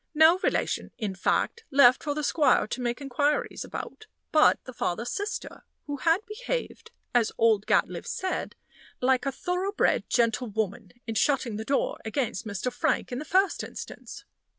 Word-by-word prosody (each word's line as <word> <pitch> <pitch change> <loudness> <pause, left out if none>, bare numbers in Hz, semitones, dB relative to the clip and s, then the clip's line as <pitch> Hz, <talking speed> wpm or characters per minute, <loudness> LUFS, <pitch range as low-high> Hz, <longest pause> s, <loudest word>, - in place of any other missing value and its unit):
No 320 +4 +6
relation, - - -1
in 210 -4 -3
fact, 325 - 0
left 265 -3 +6
for 290 -3 -2
the 300 - -2
squire 300 0 +3
to 245 +3 -5
make 240 +2 -2
inquiries 285 +2 0
about 435 - -8 0.2
but 310 -1 +5
the 255 - -8
father's 230 +1 -2
sister 425 +4 -5 0.2
who 290 -1 -4
had 330 +8 +2
behaved, - - -4 0.2
as 240 -3 +3
old 220 -3 +3
Gatliffe - - +1
said, 375 0 -3 0.4
like 260 +1 +2
a - - +1
thorough 360 +7 -2
bred 410 - +1
gentlewoman 220 -4 0
in 225 - -3
shutting 235 -1 +1
the 220 - -4
door 275 +2 0
against 225 -3 -2
Mr. 210 +4 -3
Frank 245 - 0
in 245 - -3
the 305 - -6
first 380 +3 +2
instance. - - -9
270 Hz, 160 wpm, -27 LUFS, 230-330 Hz, 0.4 s, No